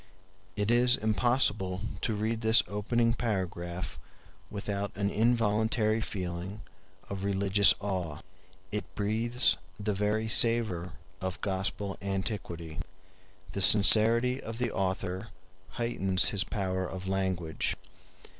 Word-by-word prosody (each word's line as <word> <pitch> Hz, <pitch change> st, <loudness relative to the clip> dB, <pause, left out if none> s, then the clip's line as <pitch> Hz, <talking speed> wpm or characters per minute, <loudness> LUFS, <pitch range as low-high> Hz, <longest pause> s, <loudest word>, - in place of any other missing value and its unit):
It 105 Hz, +2 st, 0 dB
is 125 Hz, +1 st, +4 dB
impossible 110 Hz, -4 st, +1 dB, 0.2 s
to 110 Hz, -, -1 dB
read 110 Hz, +2 st, -2 dB
this 110 Hz, 0 st, +5 dB
opening 115 Hz, +4 st, 0 dB
paragraph 90 Hz, -, -3 dB, 0.5 s
without 100 Hz, 0 st, -4 dB
an 100 Hz, 0 st, -1 dB
involuntary 110 Hz, -1 st, +1 dB
feeling 95 Hz, +1 st, -5 dB, 0.5 s
of 100 Hz, -1 st, -5 dB
religious 100 Hz, 0 st, +4 dB
awe; 90 Hz, -7 st, -4 dB, 0.5 s
it 105 Hz, -, -5 dB
breathes 115 Hz, +4 st, +1 dB, 0.2 s
the 105 Hz, +1 st, -1 dB
very 105 Hz, +2 st, 0 dB
savor 110 Hz, -6 st, +2 dB, 0.3 s
of 95 Hz, +2 st, -4 dB
Gospel 95 Hz, 0 st, 0 dB
antiquity. 95 Hz, -5 st, -4 dB, 0.7 s
The 100 Hz, -, -3 dB
sincerity 115 Hz, +6 st, +5 dB
of 115 Hz, 0 st, -7 dB
the 120 Hz, -2 st, -1 dB
author 95 Hz, +1 st, -2 dB, 0.5 s
heightens 95 Hz, -6 st, +2 dB
his 100 Hz, -2 st, +2 dB
power 95 Hz, -3 st, -2 dB
of 95 Hz, +1 st, -7 dB
language. 95 Hz, -4 st, -1 dB
100 Hz, 110 wpm, -29 LUFS, 95-110 Hz, 0.7 s, this